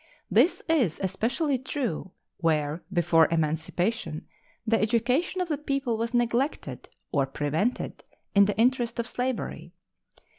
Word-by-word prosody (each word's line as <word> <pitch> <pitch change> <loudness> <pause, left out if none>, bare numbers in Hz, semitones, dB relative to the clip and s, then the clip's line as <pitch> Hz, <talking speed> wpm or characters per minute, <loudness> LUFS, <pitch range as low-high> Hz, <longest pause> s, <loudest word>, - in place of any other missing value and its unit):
This 355 - +4
is 260 - +2
especially 245 - 0
true 250 - -3 0.3
where 155 -1 0
before 165 -3 +4
emancipation 160 +2 -1 0.4
the 225 0 +2
education 250 - +1
of 360 - -1
the 300 -4 -2
people 275 -5 -1
was 230 +1 -2
neglected 240 +4 -1 0.2
or 140 -2 +1
prevented, 150 - -2 0.3
in 200 0 +7
the 200 -1 -1
interest 240 0 +2
of 235 - -1
slavery. 250 0 -3
225 Hz, 120 wpm, -27 LUFS, 165-255 Hz, 0.4 s, in